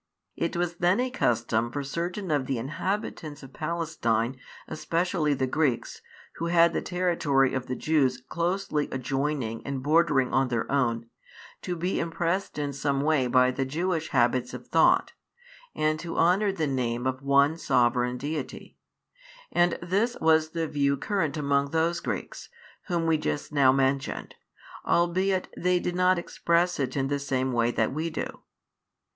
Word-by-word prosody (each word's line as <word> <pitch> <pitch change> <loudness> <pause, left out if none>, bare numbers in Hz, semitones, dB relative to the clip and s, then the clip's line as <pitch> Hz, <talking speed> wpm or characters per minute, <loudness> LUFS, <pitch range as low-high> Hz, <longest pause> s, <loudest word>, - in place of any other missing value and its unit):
It 170 - -2
was 175 0 -1
then 180 +5 +2
a 255 0 0
custom 120 - 0
for 145 +3 -3
certain 175 +5 -3
of 140 -3 0
the 135 - -1
inhabitants 155 - -4
of 135 -1 -12
Palestine, 145 -8 -1 0.3
especially 165 -1 0
the 130 - 0
Greeks, 130 -2 -1 0.4
who 170 - -2
had 170 0 +4
the - - -1
territory 170 -7 +1
of 130 -1 -3
the 130 - -2
Jews 135 -5 +1
closely 170 +2 -2
adjoining 135 -2 -2
and 135 -2 -4
bordering 150 -3 +3
on 130 0 +3
their 120 -2 -1
own, 120 -4 0 0.5
to 180 - -3
be 180 +3 -1
impressed 170 +3 -2
in 145 -1 -2
some 140 0 -1
way 145 -3 +2
by 125 +1 +4
the 135 +1 -2
Jewish 160 +4 -1
habits 120 +1 +1
of - - -9
thought, - - +3 0.6
and 155 0 +1
to 170 0 -6
honour 190 +5 +3
the 165 -5 -1
name 125 -3 -1
of 130 0 -1
One 140 +2 +3
Sovereign 125 -4 +1
[Deity]; 145 +1 -6 0.7
and 175 0 +2
this 205 +7 0
was 160 -1 +3
the 165 -1 -1
view 140 -2 +1
current 165 -3 -1
among 140 -1 +1
those 165 +2 +1
Greeks, - - -5 0.4
whom 170 -3 0
we 160 -1 +2
just 145 -1 -3
now 135 -3 +5
mentioned, 135 0 -1 0.5
albeit 185 +2 +1
they 180 0 +1
did 175 - -2
not 180 0 +3
express 170 0 0
it 135 0 -2
in 135 0 +1
the 145 0 -1
same 130 -2 -1
way 120 0 +2
that 120 - 0
we 160 +3 -2
do. 160 - -5
150 Hz, 160 wpm, -27 LUFS, 130-170 Hz, 0.7 s, now